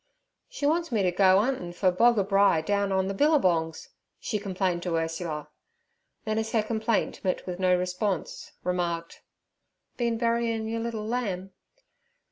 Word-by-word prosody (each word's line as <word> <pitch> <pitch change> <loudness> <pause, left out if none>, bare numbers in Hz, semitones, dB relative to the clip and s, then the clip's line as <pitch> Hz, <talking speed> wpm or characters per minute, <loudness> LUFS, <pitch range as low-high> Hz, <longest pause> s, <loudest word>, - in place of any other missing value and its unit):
'She 285 - -4
wants 335 +2 +1
me 215 -4 +1
t' 180 - +2
go 185 +1 +5
'untin' 210 -5 0
fer 185 +1 +2
boggabri 200 -5 +3
down 200 -1 +1
on 190 0 +1
ther 195 - -2
billabongs' 185 - +1 0.3
she 210 - -2
complained 185 -3 -1
to 175 -1 -2
Ursula. 165 -2 -3 0.8
Then, 215 0 0
as 220 0 -3
her 220 -2 +3
complaint 220 0 -1
met 185 -2 -1
with 180 -1 -5
no 185 -1 +3
response, 180 +1 -3
remarked, 170 -2 -2 0.8
'Been 235 -2 0
buryin' 230 -1 0
yer 230 +1 -2
liddle 225 -2 -3
lamb?' 200 -5 -3
195 Hz, 145 wpm, -27 LUFS, 180-225 Hz, 0.8 s, go